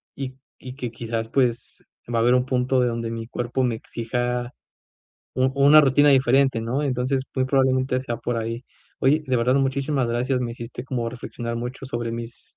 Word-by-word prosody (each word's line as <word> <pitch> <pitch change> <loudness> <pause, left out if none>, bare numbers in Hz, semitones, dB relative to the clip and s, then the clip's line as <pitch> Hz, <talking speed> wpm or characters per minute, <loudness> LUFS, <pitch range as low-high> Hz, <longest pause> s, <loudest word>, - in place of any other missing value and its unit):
y 130 -1 -6 0.2
y 130 0 -9
que 120 -5 -4
quizás, 115 0 -3
pues, 120 -3 -1 0.3
va 115 - +2
a - - +3
haber 120 +2 +4
un 125 0 +2
punto 130 0 +1
de 125 - +3
donde 115 -1 -3
mi 115 0 -5
cuerpo 120 +2 -2
me 120 -2 0
exija 120 +2 -3 0.8
u 130 +1 +2
una 145 +2 +7
rutina 145 +2 +4
diferente, 135 -2 +4
¿no? 130 +6 -1
Entonces 130 0 0
muy 130 -1 +1
probablemente 130 -1 +2
sea 120 -2 -4
por 120 +1 -2
ahí. 115 +2 -4 0.4
Oye, 150 +4 +3
de 130 -1 +1
verdad, 125 +2 +2
muchísimas 135 0 0
gracias, 125 +2 0
me 120 -2 -2
hiciste 120 +1 -7
como 120 -3 -3
reflexionar 115 -1 -5
mucho 125 +3 -5
sobre 120 -2 -3
mis 115 0 -8
125 Hz, 185 wpm, -23 LUFS, 115-130 Hz, 0.8 s, una